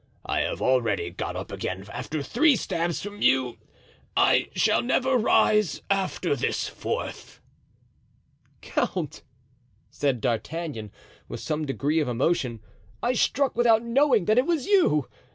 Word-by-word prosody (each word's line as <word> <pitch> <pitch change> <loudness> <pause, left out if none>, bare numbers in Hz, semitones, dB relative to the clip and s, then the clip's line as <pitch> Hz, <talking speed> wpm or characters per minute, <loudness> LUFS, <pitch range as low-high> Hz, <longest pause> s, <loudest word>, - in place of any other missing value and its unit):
"I - - 0
have - - -2
already 115 -9 +1
got 90 - -5
up - - -6
again 95 +1 -4
after 155 -2 -4
three 280 - +3
stabs 170 -5 -2
from 205 +1 -8
you, 130 -2 +2 0.6
I - - +4
shall - - +3
never 260 +1 +1
rise 215 - +3
after 190 -5 0
this 130 - -1
fourth." - - -5 1.2
"Count!" - - -2 0.7
said 140 -4 0
D'Artagnan, 120 -1 -3 0.4
with - - -7
some 155 0 -2
degree 145 +3 0
of 150 - 0
emotion, 125 -2 0 0.4
"I 245 - +2
struck 270 +2 +1
without 230 -1 +4
knowing 235 -4 +3
that 215 +3 +4
it 255 - +1
was 325 -6 0
you. 345 - +3
170 Hz, 135 wpm, -26 LUFS, -, 1.2 s, I